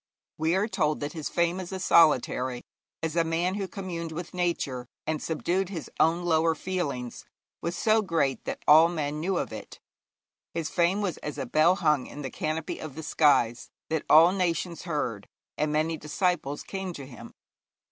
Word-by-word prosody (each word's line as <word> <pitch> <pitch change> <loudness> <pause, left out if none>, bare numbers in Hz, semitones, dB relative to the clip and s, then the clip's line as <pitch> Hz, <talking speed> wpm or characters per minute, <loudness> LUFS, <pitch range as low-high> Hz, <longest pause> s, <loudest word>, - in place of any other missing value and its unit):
We 160 +3 +2
are 200 +3 +1
told 155 -8 0
that 145 +1 -3
his 155 -3 -4
fame 170 +1 +1
as 185 -1 -6
a 190 - -4
solitary, 130 -7 +3 0.4
as 160 0 -2
a - - +3
a - - +2
man 165 +3 0
who 195 -1 -3
communed 175 -4 -5
with 170 +3 -6
Nature, 160 -9 -2 0.2
and 155 -1 -2
subdued 175 +3 -1
his 170 -6 -6
own 170 +2 +3
lower 160 -1 +3
feelings, 145 -11 -3 0.4
was 170 +1 -3
so 220 0 +3
great 165 -9 0
that - - -5
all 160 +2 +8
men 150 -3 -2
knew 180 +3 0
of - - -3
it. - - -9 0.8
His 165 -2 -2
fame 180 +4 +2
was 185 -5 -2
as 150 - -6
a - - -3
'bell 160 +4 +4
hung 150 -7 +1
in 145 - -8
the 135 - -4
canopy 155 +1 -3
of 155 -4 -7
the 160 - -6
skies,' 125 -7 +2 0.2
that 160 -2 0
all 165 +3 +8
nations 175 -2 -1
heard; 120 -10 -2 0.3
and 150 0 0
many 155 +2 0
disciples 150 -1 -1
came 190 -2 -5
to 140 -4 -8
him. 130 -2 -12
165 Hz, 185 wpm, -27 LUFS, 150-180 Hz, 0.8 s, all